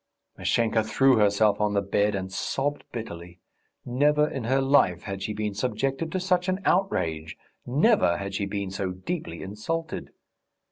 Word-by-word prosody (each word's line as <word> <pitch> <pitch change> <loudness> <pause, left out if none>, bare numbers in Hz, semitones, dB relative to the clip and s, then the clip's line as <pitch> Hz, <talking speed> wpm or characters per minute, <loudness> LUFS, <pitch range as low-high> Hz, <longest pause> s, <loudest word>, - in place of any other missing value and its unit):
Mashenka 115 -1 +1
threw 135 +4 +4
herself 105 0 +3
on 105 -1 +1
the 100 - +3
bed 100 +1 +1
and 95 -1 -4
sobbed 140 +7 -2
bitterly. 90 -6 -7 0.5
Never 150 +4 +3
in 135 -6 -5
her 130 +3 +2
life 135 -10 +3
had 95 0 -5
she 100 - -3
been 105 -1 -3
subjected 135 +9 -2
to 185 - -1
such 180 0 +1
an 185 +1 0
outrage, 80 - 0 0.3
never 145 - +3
had 100 0 -5
she 100 0 -1
been 100 -1 -3
so 95 -1 -2
deeply 95 - -5
insulted.... 150 +12 -4
110 Hz, 155 wpm, -26 LUFS, 100-145 Hz, 0.5 s, threw